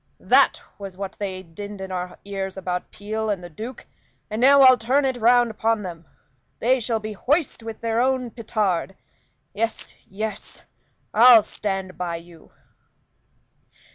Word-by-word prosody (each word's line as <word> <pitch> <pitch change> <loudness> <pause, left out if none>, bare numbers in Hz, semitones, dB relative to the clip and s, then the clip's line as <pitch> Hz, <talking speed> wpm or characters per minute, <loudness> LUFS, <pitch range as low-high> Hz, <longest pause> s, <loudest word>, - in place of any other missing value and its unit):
That - - +5 0.2
was 195 -2 -8
what 195 -1 -4
they 190 -2 -4
dinned 200 +4 -9
in 190 0 -6
our 180 0 -4
ears 195 -1 -4
about 180 -1 -3
Peel 215 +1 -4
and 195 -4 -2
the 175 - -9
Duke; 230 +10 -8 0.5
and 215 +2 -2
now 280 +2 +7
I'll 255 -1 +9
turn 265 +5 +2
it 260 -1 0
round 240 0 +4
upon 220 0 0
them. 170 -3 -8 0.5
They 255 +3 +2
shall 230 -1 -1
be 215 0 -6
hoist 285 - 0
with 225 -1 -8
their 230 0 0
own 255 -2 0
petard. 205 -6 -1 0.6
Yes, 225 +3 -3
yes, 215 +3 -6 0.5
I'll 230 0 +8
stand 195 -3 -4
by 175 -2 -2
you." 170 -1 -13
215 Hz, 150 wpm, -23 LUFS, 190-235 Hz, 0.6 s, I'll